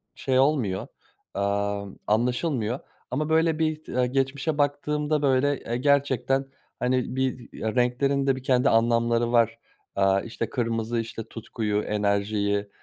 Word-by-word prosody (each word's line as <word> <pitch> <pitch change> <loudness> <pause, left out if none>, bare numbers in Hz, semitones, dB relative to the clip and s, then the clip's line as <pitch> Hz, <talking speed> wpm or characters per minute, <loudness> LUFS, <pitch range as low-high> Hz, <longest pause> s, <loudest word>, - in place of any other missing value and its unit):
şey 130 -1 +1
olmuyor, 130 -10 +1 0.5
amm, 100 0 -1
anlaşılmıyor 120 +2 0 0.3
ama, 150 +4 -1
böyle, 160 0 +2
bir 155 -1 0
t - - -6
aaa, 125 - +4
geçmişe 135 +4 -1
baktığımda, 150 +1 0
böyle, 140 0 +2
eee, 120 +1 -3
gerçekten, 135 -1 +2 0.3
hani, 125 0 0
bizi, 130 -2 -2
eee, 110 +2 -3
renklerin 135 +3 +1
de 135 - +3
bir 130 - -8
kendi 130 +1 +3
anlamları 115 +1 +2
var. 115 -1 +3 0.4
Aaa, 95 0 +3
işte, 115 +1 -4
kırmızı, 115 -1 -1
işte, 115 0 -5
tutkuyu, 110 -2 -2
enerjiyi, 100 0 0
125 Hz, 135 wpm, -26 LUFS, 110-140 Hz, 0.5 s, aaa